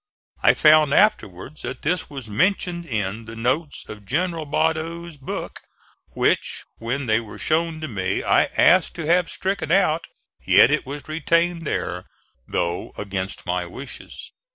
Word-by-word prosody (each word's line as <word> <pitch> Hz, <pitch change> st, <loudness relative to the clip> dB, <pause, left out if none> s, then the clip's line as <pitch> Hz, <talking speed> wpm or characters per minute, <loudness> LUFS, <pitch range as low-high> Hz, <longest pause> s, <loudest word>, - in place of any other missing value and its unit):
I -, -, +5 dB
found 155 Hz, -1 st, +5 dB
afterwards 140 Hz, -, +1 dB
that 130 Hz, +2 st, -6 dB
this 175 Hz, +4 st, 0 dB
was 135 Hz, -5 st, -7 dB
mentioned 175 Hz, -, 0 dB
in 110 Hz, -2 st, -3 dB
the 115 Hz, +1 st, -9 dB
notes 130 Hz, +7 st, -2 dB
of 105 Hz, -1 st, -9 dB
General 165 Hz, -, -1 dB
Badeau's 160 Hz, +2 st, -1 dB
book, 135 Hz, -2 st, -6 dB, 0.6 s
which, -, -, +1 dB, 0.2 s
when 125 Hz, +4 st, -2 dB
they 110 Hz, -1 st, +3 dB
were 110 Hz, -3 st, -9 dB
shown 160 Hz, 0 st, 0 dB
to 155 Hz, -, -3 dB
me, 95 Hz, -6 st, -2 dB
I -, -, +4 dB
asked 185 Hz, -1 st, +5 dB
to 170 Hz, -, -4 dB
have 175 Hz, +2 st, +3 dB
stricken 190 Hz, -4 st, -2 dB
out; 170 Hz, -4 st, +2 dB, 0.4 s
yet -, -, +6 dB
it -, -, 0 dB
was 145 Hz, +1 st, -7 dB
retained 165 Hz, +1 st, +1 dB
there, -, -, -3 dB, 0.4 s
though 85 Hz, +1 st, -2 dB
against 100 Hz, -2 st, -4 dB
my 90 Hz, -1 st, -1 dB
wishes. 130 Hz, +10 st, -9 dB
150 Hz, 150 wpm, -23 LUFS, 115-165 Hz, 0.6 s, yet